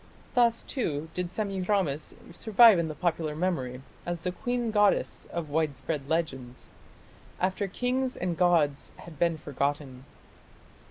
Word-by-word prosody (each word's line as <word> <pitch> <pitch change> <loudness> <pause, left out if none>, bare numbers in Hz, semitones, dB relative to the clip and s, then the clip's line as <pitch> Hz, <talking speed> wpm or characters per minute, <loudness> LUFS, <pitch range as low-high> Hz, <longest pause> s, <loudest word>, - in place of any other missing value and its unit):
Thus, 235 -2 +3
too, 160 - -3
did 180 -1 -3
Semiramis 190 -7 -1 0.2
survive 220 0 +6
in 165 - 0
the 155 - -5
popular 160 -3 -1
memory, 135 -7 -2 0.2
as 175 -1 -4
the 180 - -1
queen 245 +2 -2
goddess 205 -1 +2
of 165 -4 -4
widespread 145 -1 -1
legends, 135 -7 -3 0.7
after 190 +2 0
kings 250 +5 -1
and 180 -1 -1
gods 165 -5 +2
had 160 -5 -12
been 170 -2 +2
forgotten. 140 -2 -3
170 Hz, 125 wpm, -28 LUFS, 145-200 Hz, 0.7 s, survive